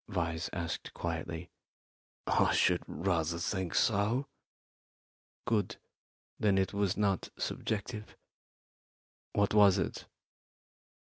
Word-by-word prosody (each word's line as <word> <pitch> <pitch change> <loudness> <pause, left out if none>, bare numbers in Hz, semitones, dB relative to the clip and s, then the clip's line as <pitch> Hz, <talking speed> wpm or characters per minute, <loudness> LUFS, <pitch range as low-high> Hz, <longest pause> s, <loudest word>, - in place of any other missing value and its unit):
Vyse 85 -2 -1
asked 85 -1 -4
quietly. 85 0 -4 0.7
"I - - +3
should - - +3
rather 85 -3 0
think 95 0 -2
so." 110 +5 +2 1.2
"Good; 110 -5 +1 0.6
then 100 -2 +3
it 95 +1 +1
was 100 -1 +1
not 100 -3 +1
subjective. 105 0 -3 1.2
What 100 0 +2
was 100 -3 +7
it?" - - -3
95 Hz, 90 wpm, -32 LUFS, 85-105 Hz, 1.2 s, was